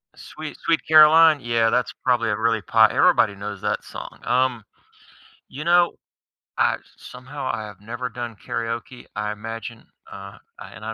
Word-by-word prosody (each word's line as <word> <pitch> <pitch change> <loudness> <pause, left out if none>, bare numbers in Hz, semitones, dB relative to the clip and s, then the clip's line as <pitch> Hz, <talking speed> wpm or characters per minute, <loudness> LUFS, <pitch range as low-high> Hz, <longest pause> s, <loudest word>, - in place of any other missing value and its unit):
Sweet 155 -1 -9
Sweet 165 -1 +1
Caroline, 155 0 +7
yeah, 115 -2 +1
that's 125 +2 0
probably 120 -3 +1
a 105 - -1
really 110 -1 0
pot 110 +4 +4
everybody 145 - +3
knows 100 0 -7
that - - -2
song, - - -10
um, 125 -2 0 0.9
you 150 +4 -8
know, 175 0 +3 0.6
I - - +2 0.2
somehow, 130 +2 -8
I 110 -1 -4
have 105 -3 -12
never 120 +4 -5
done 120 -1 -7
karaoke, 115 +2 -5
I 105 0 -2
imagine 115 +2 -8 0.3
uh, 100 0 -10 0.4
and - - -12
I 110 - -4
115 Hz, 155 wpm, -22 LUFS, 110-130 Hz, 0.9 s, Caroline